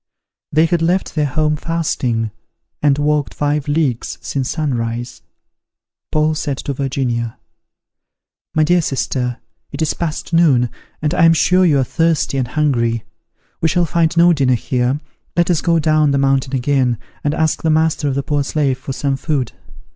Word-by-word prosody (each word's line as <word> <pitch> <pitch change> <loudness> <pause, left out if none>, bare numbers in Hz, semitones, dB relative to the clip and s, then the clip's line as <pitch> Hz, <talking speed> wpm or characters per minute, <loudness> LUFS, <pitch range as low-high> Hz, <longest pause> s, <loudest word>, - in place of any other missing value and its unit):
They 155 +2 +4
had 165 0 0
left 180 +3 0
their 150 -2 +1
home 150 +2 +1
fasting, 130 -9 -1 0.5
and 145 -2 +3
walked 150 -1 0
five 145 0 -1
leagues 145 -6 -1
since 135 -2 -3
sunrise. 120 -5 -3 0.9
Paul 155 0 +2
said 145 -3 -3
to 140 - -4
Virginia, 130 -4 -2 1.2
"My 155 - +4
dear 175 +3 +3
sister, 125 -3 -2 0.3
it 140 - -7
is 155 - 0
past 165 0 -4
noon, 135 -8 +4 0.3
and 150 - +1
I 165 - +4
am 165 - +6
sure 180 +3 +3
you 150 -4 +3
are 135 - +3
thirsty 160 0 0
and 125 - -1
hungry: 120 -5 0 0.6
we 160 - +3
shall 175 +1 +2
find 165 +1 +1
no 170 +1 +6
dinner 135 -5 +2
here; 125 +3 -1 0.4
let 175 +1 +3
us 165 - +1
go 170 -1 +2
down 155 -1 +3
the 140 - +2
mountain 135 0 +1
again, 130 -2 +1 0.3
and 150 +1 0
ask 160 -1 0
the 160 - 0
master 155 -1 +2
of 135 - 0
the 140 - -1
poor 145 -1 0
slave 140 -2 0
for 135 - -5
some 140 +1 -1
food." 135 -6 -1
145 Hz, 170 wpm, -18 LUFS, 130-160 Hz, 1.2 s, am